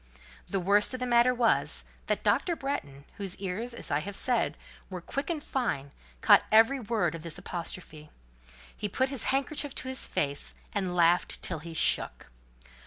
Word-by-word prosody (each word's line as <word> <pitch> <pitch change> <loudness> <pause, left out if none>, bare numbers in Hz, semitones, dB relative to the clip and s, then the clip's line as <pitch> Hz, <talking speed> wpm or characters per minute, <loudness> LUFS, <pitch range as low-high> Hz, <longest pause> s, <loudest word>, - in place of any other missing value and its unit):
The 195 - 0
worst 205 +6 +3
of - - -6
the 250 - -1
matter 240 0 +5
was, 240 -2 +2 0.2
that - - 0
Dr. 345 - +2
Bretton, 145 - -5
whose 195 -3 -3
ears, 205 +6 -4
as 180 - -6
I 145 - +2
have 195 +6 -6
said, 245 +2 +1 0.3
were 185 -2 -5
quick 275 - -4
and 315 -4 -2
fine, 140 - -2 0.3
caught - - +7
every 225 +5 +6
word 215 -8 0
of 165 - -6
this 165 -1 -4
apostrophe; 170 -3 -5 0.7
he 210 - -3
put 260 +6 +1
his 275 -3 -2
handkerchief 275 +1 -1
to - - -4
his 260 - -1
face, 140 -1 -1 0.2
and 190 -3 -1
laughed 175 0 +3
till - - -2
he 165 -1 -9
shook. 60 - 0
205 Hz, 175 wpm, -29 LUFS, 170-255 Hz, 0.7 s, caught